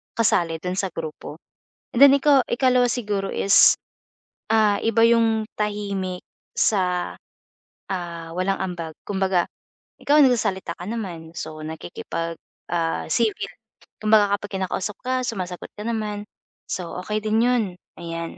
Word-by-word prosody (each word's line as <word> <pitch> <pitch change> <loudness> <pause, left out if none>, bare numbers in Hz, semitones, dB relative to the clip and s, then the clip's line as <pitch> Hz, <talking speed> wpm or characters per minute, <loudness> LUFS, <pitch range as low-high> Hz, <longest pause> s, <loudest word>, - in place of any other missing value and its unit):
kasali 175 -7 +2
dun 180 0 -2
sa 195 - 0
grupo, 155 -2 -6 0.6
and 240 - +1
then 280 - +10
ikaw 280 -1 +5
ikalawa 250 0 +3
siguro 205 -5 -2
is, 200 - +6 0.8
ah, 215 -2 +4
iba 225 0 +3
'yung 225 -2 +3
tahimik 200 -3 -2 0.3
sa, 180 -4 +1 0.8
ah, 170 -3 -4
walang 195 +1 0
ambag, 175 -4 -4
kumbaga 190 -3 +1 0.5
ikaw 295 +1 +4
nagsasalita 210 -9 +2
ka 175 - -7
naman, 175 -8 -5
so 155 0 -5
nakikipag, 165 +1 -5 0.4
ah, 165 -1 0
civil, 210 -1 0 0.5
kumbaga 210 -2 +4
kapag 205 - -9
kinakausap 190 +2 -2
ka 255 0 0
sumasagot 185 -6 -4
ka 210 - -6
naman 210 -2 -2 0.4
so 180 -2 -4
okey 210 +3 -2
din 215 +1 +2
'yun, 245 -1 +3 0.4
ayan. 165 0 -5
200 Hz, 125 wpm, -23 LUFS, 175-225 Hz, 0.8 s, then